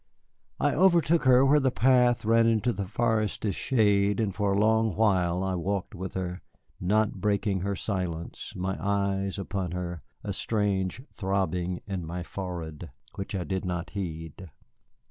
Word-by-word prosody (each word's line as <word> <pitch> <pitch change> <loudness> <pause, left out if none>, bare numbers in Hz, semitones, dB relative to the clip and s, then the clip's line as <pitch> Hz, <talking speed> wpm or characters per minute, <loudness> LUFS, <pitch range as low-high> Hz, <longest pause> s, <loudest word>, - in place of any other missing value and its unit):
I 145 - +2
overtook 170 -3 +4
her 130 +1 +6
where 145 +2 +5
the 135 -2 +2
path 125 -2 +3
ran 115 +1 +4
into 115 +1 +2
the 100 -3 -4
forest's 110 -2 0
shade, 105 -4 +2
and 105 -4 0
for 100 0 0
a - - +1
long 110 -2 +3
while 95 -4 +2
I 95 -1 -1
walked 95 +2 -2
after 95 +1 -4
her, 90 +1 -7 0.4
not 105 +1 +1
breaking 100 -1 +1
her 100 +2 -2
silence, 90 -5 -4
my 95 +1 -2
eyes 100 -1 0
upon 95 -3 -3
her, 90 -3 -4 0.2
a - - -3
strange 105 0 -1
throbbing 90 -3 -1
in 95 -4 -4
my 90 +2 -4
forehead 85 -4 -6 0.2
which 95 +1 -5
I 90 - -1
did 95 +1 -3
not 90 -1 -3
heed. 85 -2 -6
100 Hz, 155 wpm, -28 LUFS, 90-110 Hz, 0.4 s, her